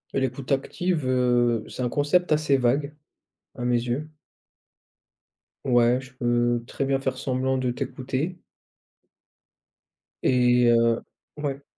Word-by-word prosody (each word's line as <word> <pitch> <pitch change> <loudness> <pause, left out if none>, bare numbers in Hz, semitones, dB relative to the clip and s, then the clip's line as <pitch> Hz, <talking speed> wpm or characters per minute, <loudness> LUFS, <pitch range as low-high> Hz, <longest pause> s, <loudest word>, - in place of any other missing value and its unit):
L'écoute 135 0 -2
active, 155 +3 0
heu, 120 -3 +2
c'est - - -6
un 125 - 0
concept 155 +5 +1
assez 150 -2 +3
vague, 140 +4 +1 0.6
à 125 -1 -4
mes 125 0 +3
yeux. 125 +6 -3 1.6
Ouais, 120 -1 +4
je 130 0 -13
peux 120 -1 +1
très - - -3
bien 135 0 +1
faire 130 -1 -2
semblant 130 0 -1
de 130 -1 0
t'écouter. 135 +7 -3 1.9
Et 125 -1 +4
heu 115 0 +3 0.4
ouais. 140 -2 -4
130 Hz, 115 wpm, -25 LUFS, 120-140 Hz, 1.9 s, Ouais